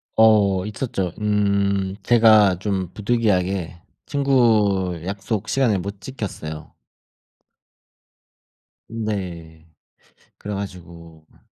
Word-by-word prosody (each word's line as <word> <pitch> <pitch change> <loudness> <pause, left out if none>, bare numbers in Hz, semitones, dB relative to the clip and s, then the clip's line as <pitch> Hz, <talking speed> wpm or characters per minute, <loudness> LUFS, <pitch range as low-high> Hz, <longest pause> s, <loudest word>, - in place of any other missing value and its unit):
어 100 -4 +4
있었죠. 105 -5 -3
음. 100 -2 0
제가 110 -6 +5
좀 95 -3 -2
부득이하게 95 -6 -1 0.2
친구 110 - +2
약속 100 +2 -3
시간을 120 -8 +2
못 100 +2 -7
지켰어요. 85 - -7 2.2
네 90 -8 -5 0.7
그래 105 0 -6
가지고 85 -5 -9
음 - - -25
100 Hz, 165 characters per minute, -22 LUFS, 90-110 Hz, 2.2 s, 제가